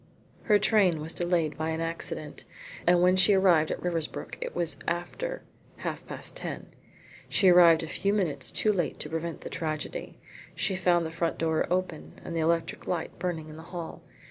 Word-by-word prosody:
Her 210 -2 +5
train 200 -6 +3
was 155 +2 -4
delayed 175 -3 0
by 160 0 -1
an 160 0 -2
accident, 165 -2 -4 0.4
and 175 0 +5
when 180 +1 +5
she 185 +2 +6
arrived 175 -5 +4
at - - -2
Riversbrook 170 -3 -3
it - - -5
was 170 -2 -1
after 175 - -3 0.3
half - - -4
past - - -6
ten. - - -6 0.6
She 190 - +5
arrived 170 -2 +7
a - - -4
few 195 +5 0
minutes 190 -8 -1
too 215 - +2
late 175 -5 -1
to 150 - -3
prevent 165 +1 -4
the - - -7
tragedy. 155 -2 -4 0.4
She 195 -3 0
found 175 -2 +2
the 160 - -4
front 165 0 -1
door 160 -1 +1
open 180 -3 -3
and 170 - -5
the - - 0
electric 165 +1 0
light 170 -2 -3
burning 170 -3 -3
in 155 - -10
the - - -9 0.2
hall. 165 -1 -6
170 Hz, 185 wpm, -28 LUFS, 160-180 Hz, 0.6 s, arrived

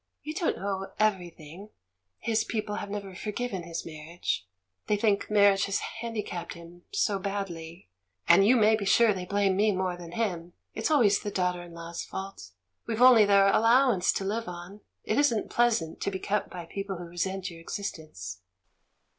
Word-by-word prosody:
You 305 - -5
don't 330 +1 -1
know 195 0 -4
everything; 180 -3 -2 0.5
his 220 - 0
people 210 -2 -3
have 200 - -5
never 200 -2 -5
forgiven 210 0 -4
his 170 0 -6
marriage 155 - -4 0.2
— 95 0 -49
thej^ 210 -1 +1
think 205 -2 +1
marriage 200 -2 +4
has 195 - 0
handicapped 215 -8 -5
him 170 +1 -13
so 215 - +1
badly 180 - -5 0.2
— 90 -1 -43
and, 195 - +7
you 230 +6 +5
may 220 -2 +5
be 215 - -3
sure, 220 +2 +4
they 185 -2 -5
blame 200 0 +1
me 210 +2 +3
more 185 -2 -1
than 175 -1 -10
him; 175 -6 -2 0.2
it's 220 - -1
always 230 -10 +4
the 205 - -4
daughter 180 -2 -1
in 175 -1 -11
law's 170 0 -6
fault! 195 - -7 0.4
We've 225 -1 -2
only 245 -4 +8
their 200 -1 +5
allowance 230 -3 +4
to - - -2
live 225 +3 -2
on 180 +4 -8
— - - -54
it 215 - 0
isn't 240 -7 +1
pleasant 230 -9 +1
to - - 0
be 190 - -3
kept 200 +2 -2
by 175 -2 -7
people 195 +2 -5
who 175 - -7
resent 180 +2 -3
your 165 - -11
existence." 155 - -6
195 Hz, 185 wpm, -28 LUFS, 175-215 Hz, 0.5 s, only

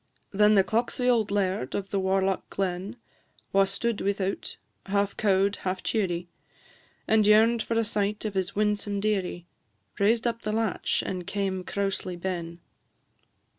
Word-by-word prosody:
Then 210 +1 +5
the 195 - +6
clocksie 240 +4 0
auld 230 -4 +3
laird 190 -9 -1
of 195 -1 -4
the 200 - +1
warlock 190 0 0
glen, 190 +3 -3 0.6
Wha 195 0 +5
stood 205 +3 -1
without, 195 -1 -2 0.3
half 200 0 0
cow'd, 200 -1 +2
half 185 0 -3
cheerie. 175 -5 -1 0.8
And 215 -1 +4
yearn'd 225 +2 +5
for 230 - -2
a 230 - +3
sight 210 -1 -1
of 210 - -2
his 190 -2 -2
winsome 210 -1 0
dearie, 195 -4 -1 0.5
Raised 220 +4 +3
up 230 -1 -1
the 215 - -2
latch 220 -3 0
and 180 -2 -4
came 190 -2 -2
crousely 195 -2 -2
ben. 170 -2 -4
200 Hz, 145 wpm, -27 LUFS, 190-215 Hz, 0.8 s, the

